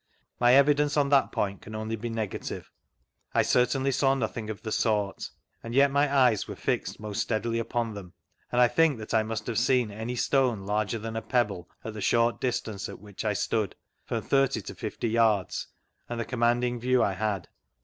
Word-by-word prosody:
My 120 0 +5
evidence 145 +1 +4
on 140 -1 +3
that 140 -1 +4
point 100 -1 -2
can 110 - -9
only 110 +1 -3
be 115 +2 -5
negative 110 -3 -4 0.6
1 - - +4
certainly 135 +2 +2
saw 135 +1 +3
nothing 110 -3 -3
of 110 0 -6
the 110 - -4
sort, 105 -3 0 0.3
and 115 +1 -6
yet 140 +1 +5
my 140 0 +2
eyes 125 -7 +3
were - - -6
fixed - - -2
most 105 -1 -3
steadily 115 +1 -1
upon 115 -1 -2
them, 95 -4 -9 0.4
and 120 - +1
I 125 - +7
think 160 +1 +3
that 110 -1 -7
I 110 - +4
must 110 0 -4
have 115 -2 0
seen 125 -2 +2
any 110 +4 -4
stone 125 -4 +1
larger 105 +2 0
than 110 +1 -6
a 110 - -2
pebble 105 -9 -1 0.2
at 110 - -4
the 105 - -6
short 115 +3 +2
distance 110 -5 -2
at - - -8
which 105 0 -8
I 105 -1 +1
stood 105 0 -1 0.3
(from - - -3
thirty 135 -4 +2
to - - -7
fifty 115 - -4
yards) 110 -4 +1 0.4
and 120 -1 -3
the 115 - -2
commanding 120 0 +1
view 125 +1 +3
I 100 - +1
had. 100 -1 -2
115 Hz, 200 wpm, -28 LUFS, 110-125 Hz, 0.6 s, I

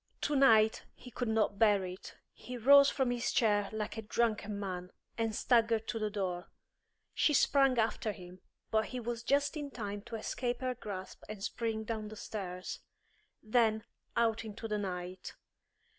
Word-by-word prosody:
Tonight 225 -7 +4
he 250 - -12
could 245 +1 -3
not 220 -2 +1
bear 205 -4 +4
it. 180 +1 -8 0.2
He 250 0 -8
rose 280 +4 +7
from 265 -3 0
his 240 -1 -1
chair 205 -3 +2
like 220 +1 -4
a - - -2
drunken 215 -2 -1
man, 180 -2 -4 0.3
and 225 -2 -1
staggered 225 -2 +2
to 225 - -2
the 215 -1 -1
door. 185 -3 -3 0.7
She 300 - +3
sprang 270 -1 +4
after 220 -1 +1
him, 180 -2 -12 0.3
but 220 0 +2
he 255 - -5
was 235 -1 -4
just 280 +5 +1
in 295 -2 -4
time 205 -5 -5
to 230 - -6
escape 240 +3 -3
her 255 -1 0
grasp 200 -6 -7
and 210 -2 -7
spring 225 -1 -2
down 220 -1 -4
the 215 - -9
stairs; 185 -4 -5 0.6
then, 220 -1 +2 0.3
out 230 -1 +2
into 220 +1 -6
the 210 -1 -1
night. 180 -1 -5
220 Hz, 165 wpm, -33 LUFS, 205-240 Hz, 0.7 s, rose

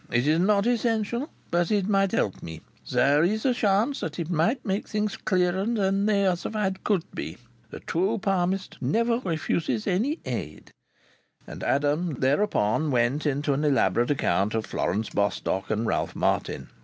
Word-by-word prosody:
It 120 +2 +2
is 155 +2 +3
not 200 +2 +3
essential, 235 +2 0 0.2
but 175 -1 +1
it 205 -3 +1
might 195 -2 +2
help 100 - -1
me. 80 -1 -8 0.3
There 145 +3 +4
is 215 +7 0
a 260 - +4
chance 220 +4 +1
that 160 -2 -5
it 170 0 -3
might 175 - +1
make 195 0 -2
things 210 -1 -1
clearer 185 -1 0
than 200 -3 +1
they 200 -2 +2
otherwise 190 +2 0
could 195 -6 +1
be. - - -5 0.3
The - - -9
true 190 +7 0
palmist 190 -1 -1
never 230 +1 +1
refuses 160 - -1
any 245 - 0
aid." 95 -11 -5 0.7
And - - -9
Adam 145 +3 +1
thereupon 140 - +1
went 130 +4 +1
into 145 0 0
an 140 +3 -1
elaborate 120 -6 +2
account 105 -7 +1
of 110 - -1
Florence 105 +5 -2
Bostock 100 -1 -1
and 110 +1 0
Ralph - - -1
Martin. - - -1
175 Hz, 160 wpm, -26 LUFS, 140-210 Hz, 0.7 s, There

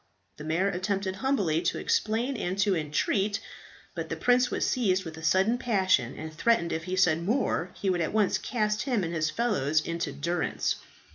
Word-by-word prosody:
The 150 - -8
mayor 165 +5 +1
attempted 190 0 -2
humbly 200 - +1
to 170 - 0
explain 235 +5 0
and 185 -4 -3
to 200 -1 +2
entreat; 190 +7 0 0.5
but - - -5
the - - -2
prince 250 +1 +3
was - - -1
seized 190 -7 +1
with 160 -1 -7
a 160 - -10
sudden 190 +9 +2
passion, 190 - +1
and 155 0 -7
threatened 170 0 +1
if 160 0 -3
he 185 0 -2
said 170 -4 +3
more 195 -3 0
he 200 - -2
would 180 -2 +1
at 160 - -1
once 210 -2 +2
cast 210 -3 -1
him 245 -8 0
and 170 0 -3
his 155 -2 0
fellows 160 - +1
into 170 -1 -3
durance. 165 +5 -1
185 Hz, 190 wpm, -28 LUFS, 165-215 Hz, 0.5 s, prince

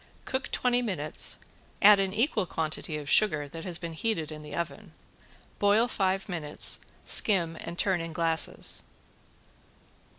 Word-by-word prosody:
Cook 260 0 -3
twenty 245 0 +1
minutes, 175 -10 0 0.4
add 205 0 +7
an 195 -1 0
equal 215 - 0
quantity 155 -1 -3
of 150 -1 -8
sugar 155 -5 +3
that 165 +3 -9
has 175 -3 -2
been 170 -2 -6
heated 160 -3 -2
in 150 0 -8
the 150 - -8
oven. 170 0 -5 0.7
Boil 205 +4 +3
five 195 -4 -1
minutes, 160 -6 +2 0.3
skim 170 -6 +4
and 170 - -7
turn 185 -3 +1
in 165 0 -6
glasses. 165 -1 -1
175 Hz, 140 wpm, -28 LUFS, 160-205 Hz, 0.7 s, add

